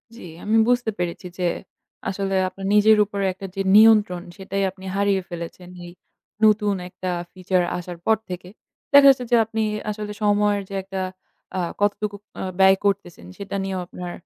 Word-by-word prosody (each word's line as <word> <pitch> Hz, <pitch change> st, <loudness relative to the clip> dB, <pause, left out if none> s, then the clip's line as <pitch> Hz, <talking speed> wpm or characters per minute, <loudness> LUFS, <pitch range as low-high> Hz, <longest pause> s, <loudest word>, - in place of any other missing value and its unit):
জি, -, -, -12 dB, 0.2 s
আমি 220 Hz, +2 st, +2 dB
বুঝতে 245 Hz, -2 st, +2 dB
পেরেছি 175 Hz, +1 st, -3 dB
যে, 180 Hz, -, 0 dB, 0.6 s
আসলে 195 Hz, 0 st, -2 dB
আপনার 195 Hz, +1 st, -9 dB
নিজের 215 Hz, +1 st, +6 dB
উপরে 200 Hz, -1 st, -3 dB
একটা 195 Hz, +1 st, -9 dB
যে 195 Hz, -, -1 dB
নিয়ন্ত্রণ 210 Hz, -5 st, +6 dB, 0.2 s
সেটাই 195 Hz, +1 st, -3 dB
আপনি 190 Hz, 0 st, -14 dB
হারিয়ে 200 Hz, -1 st, +2 dB
ফেলেছেন, 175 Hz, +1 st, -7 dB
লি 175 Hz, -, -9 dB
এই -, -, -10 dB, 0.5 s
নতুন 210 Hz, -1 st, +3 dB
একটা 185 Hz, +1 st, -5 dB, 0.2 s
feature 185 Hz, -1 st, 0 dB
আসার 175 Hz, 0 st, -7 dB
পর 220 Hz, 0 st, +4 dB
থেকে। 180 Hz, 0 st, -7 dB, 0.4 s
দেখা 280 Hz, 0 st, +9 dB
যাচ্ছে 255 Hz, -2 st, +3 dB
যে, -, -, +6 dB
আপনি 225 Hz, 0 st, -3 dB, 0.3 s
আসলে 210 Hz, 0 st, -4 dB
সময়ের 205 Hz, 0 st, +2 dB
যে 200 Hz, -, -6 dB
একটা 190 Hz, 0 st, -5 dB, 0.6 s
আ -, -, 0 dB, 0.2 s
কতটুকু 205 Hz, 0 st, 0 dB, 0.3 s
আ -, -, -3 dB, 0.2 s
ব্যয় 190 Hz, 0 st, +6 dB
করতেছেন? 195 Hz, -, -1 dB
সেটা 200 Hz, 0 st, -6 dB
নিয়েও 190 Hz, -1 st, -3 dB
আপনার 180 Hz, -1 st, -7 dB
195 Hz, 170 wpm, -23 LUFS, 185-210 Hz, 0.6 s, দেখা